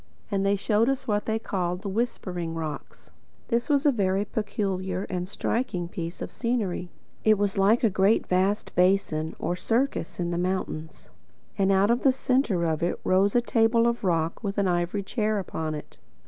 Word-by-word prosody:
And 195 -1 +1
they 200 +1 +3
showed 215 +4 +2
us 270 0 -2
what 210 -1 0
they 220 0 0
called 180 -4 -2
the - - -4
Whispering 185 -6 -2
Rocks. 155 - -6 0.4
This 235 +5 0
was 285 -1 +2
a 290 - +6
very 200 -3 +1
peculiar 195 -3 -2
and 180 0 -3
striking 200 -4 -2
piece 170 0 -5
of - - -6
scenery. 215 -7 -2 0.3
It 215 -1 +5
was 200 -1 0
like 205 +5 +3
a 225 - +5
great 195 +4 +3
vast 190 +3 0
basin, 180 -4 +2
or 175 - -2
circus, 230 -3 -1
in 175 -1 -1
the 170 - -1
mountains, 180 -4 -3 0.4
and 195 -1 +2
out 195 +3 +4
of 240 - +1
the 270 - +5
centre 255 -9 +1
of 160 -2 0
it 170 - +2
there - - -4
rose 195 +3 +3
a 240 - +5
table 230 0 +3
of 235 -1 0
rock 165 +1 0
with 200 -1 -3
an 200 -1 +2
ivory 175 +3 0
chair 215 +1 0
upon 160 -5 -3
it. 150 - -10
195 Hz, 190 wpm, -26 LUFS, 180-225 Hz, 0.4 s, a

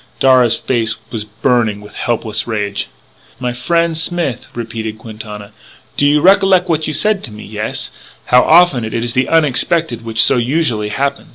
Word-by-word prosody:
Darragh's 130 -3 +4
face 115 -3 0 0.2
was 110 -3 -4
burning 110 0 0
with 105 0 -13
helpless 110 -2 -2
rage. 105 -3 -2 0.5
"My 125 -1 -2
frien', 165 +7 0
Smith," 160 -5 -2
repeated 110 -2 -5
Quintana, 105 -2 -9 0.4
"do 145 - +3
you 150 +1 +3
recollec' 190 -1 +4
what 165 -3 +2
it - - -12
was - - -3
you 155 - -2
say 215 +7 +2
to 190 - -8
me? 105 0 -10
Yes?... - - -4 0.3
How 125 0 +5
often 160 -6 +4
it 110 - -5
is 115 0 -2
the 130 +1 +1
onexpected 160 -3 +1
which 110 -1 +2
so - - +3
usually 120 -4 0
happen? 140 +5 -2
125 Hz, 175 wpm, -15 LUFS, 110-155 Hz, 0.5 s, How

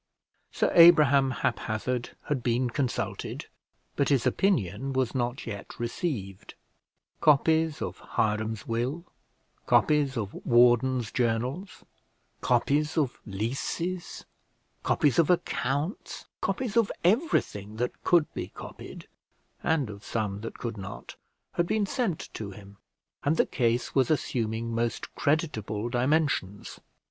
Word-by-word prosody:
Sir - - +1
Abraham 150 -6 +7
Haphazard 120 0 -2
had 145 -4 -2
been 120 +1 0
consulted, 130 -2 -3 0.5
but 140 - +1
his 135 -5 +2
opinion 135 - +1
was 130 -2 0
not 120 -1 -2
yet 100 -3 -7
received: 115 - -4 0.6
copies 160 +1 +3
of - - -5 0.2
Hiram's 110 0 0
will, 125 +9 -2 0.6
copies 145 -4 +3
of 105 -4 -3
wardens' 120 0 +4
journals, 125 - -2 0.6
copies 150 +3 +1
of 140 -5 0
leases, 135 - -3 0.6
copies 145 -2 +2
of 165 - +4
accounts, 150 - -1 0.2
copies 220 +2 -2
of 230 -3 +3
everything 175 - +1
that 125 +2 -3
could 170 -3 +4
be - - -4
copied, - - -10 0.5
and 155 -5 +1
of 100 0 -9
some 105 -3 -3
that 115 - -7
could 115 -2 -5
not, 100 +2 -8 0.4
had 170 0 0
been 215 +1 +1
sent 205 - -2
to 105 -2 -5
him; 100 0 -12 0.5
and 150 +3 +1
the - - +4
case 120 -2 0
was 130 -3 +3
assuming 115 -6 -1
most 115 -1 -2
creditable 120 -8 -1
dimensions. 125 -6 0
125 Hz, 115 wpm, -28 LUFS, 115-155 Hz, 0.6 s, Abraham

